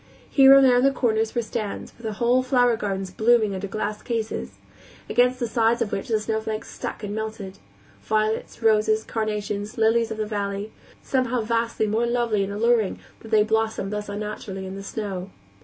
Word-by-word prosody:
Here 270 -1 +8
and 275 0 +7
there 250 -1 +5
on - - +4
the 275 - +6
corners 225 -4 0
were 235 - +1
stands, 215 -2 -5
with 225 -2 -5
whole 245 +4 +3
flower 245 -2 +3
gardens 195 -3 -3
blooming 220 0 +3
under 190 +1 -4
glass 210 +1 -3
cases, 225 -3 -4 0.5
against 250 +1 +2
the 240 - 0
sides 230 +1 +2
of 230 -4 -1
which 195 - -3
the 220 -2 +1
snowflakes 220 0 -3
stuck - - -6
and 205 0 -4
melted; 215 -3 -5 0.4
violets, 215 +2 -1
roses, 215 0 +3
carnations, 210 -1 -3
lilies 225 +1 +3
of 220 - -5
the 215 - -1
valley 205 0 -3 0.3
somehow 255 -2 0
vastly 230 0 0
more 220 +3 0
lovely 235 -4 +1
and 195 - -4
alluring 220 0 +2 0.2
that 225 - -12
they 215 -1 +5
blossomed 220 -2 -1
thus 210 0 -4
unnaturally 205 -2 -5
in 190 0 -6
the 195 - -6
snow. 195 -2 -5
220 Hz, 180 wpm, -24 LUFS, 210-235 Hz, 0.5 s, Here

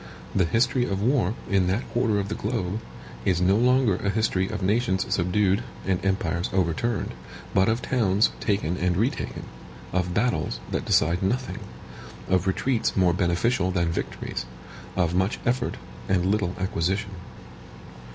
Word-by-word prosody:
The 95 - +3
history 115 +8 +2
of 100 -3 -2
war, 120 -4 +2
in 95 -2 +2
that 100 +7 -1
quarter 110 -3 +1
of 100 - -2
the 105 - -3
globe, 105 -3 -2 0.4
is 90 +4 +2
no 90 +2 +4
longer 125 -3 +3
a 100 - -1
history 100 -3 +1
of 105 -3 -4
nations 100 -1 +1
subdued 95 +4 +2 0.2
and 95 -2 0
empires 95 -3 0
overturned, 95 +4 0 0.4
but 95 +2 +4
of 115 +2 0
towns 105 -5 +2
taken 100 -5 0
and 90 -1 +1
retaken; 115 +7 -1 0.5
of 90 0 0
battles 105 -8 0
that - - -2
decide 85 +3 +3
nothing; 125 +7 -1 0.7
of 95 0 +2
retreats 115 +5 0
more 90 -2 +4
beneficial 90 +4 +1
than 85 -2 +1
victories; - - -4 0.5
of 85 -2 +1
much 95 +4 +1
effort 125 +2 0 0.3
and 90 -2 +2
little 95 -2 +1
acquisition. 95 +2 -1
95 Hz, 145 wpm, -25 LUFS, 90-110 Hz, 0.7 s, no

